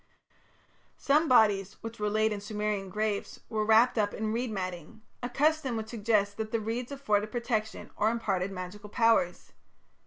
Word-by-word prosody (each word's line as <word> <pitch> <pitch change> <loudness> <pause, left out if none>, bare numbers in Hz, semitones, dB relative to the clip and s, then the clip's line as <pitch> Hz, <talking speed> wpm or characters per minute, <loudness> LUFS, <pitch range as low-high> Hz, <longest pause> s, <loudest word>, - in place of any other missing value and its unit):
Some 300 +4 +3
bodies 205 -6 +4
which 225 0 -7
were 210 0 0
laid 215 +1 +2
in 205 - -5
Sumerian 210 -2 -2
graves 210 +1 -2
were 215 -1 0
wrapped 225 +2 +4
up 205 -1 0
in 215 0 -2
reed 240 +2 -1
matting, 185 +1 -6 0.2
a 245 - -3
custom 280 -2 +1
which 220 0 -5
suggests 210 -3 +1
that 215 +1 -5
the 230 - +1
reeds 230 +4 -3
afforded 215 -7 0
protection 230 -2 -2
or 215 - +2
imparted 200 -5 -1
magical 195 +3 -7
powers. 225 -6 +1
215 Hz, 160 wpm, -29 LUFS, 205-230 Hz, 0.2 s, bodies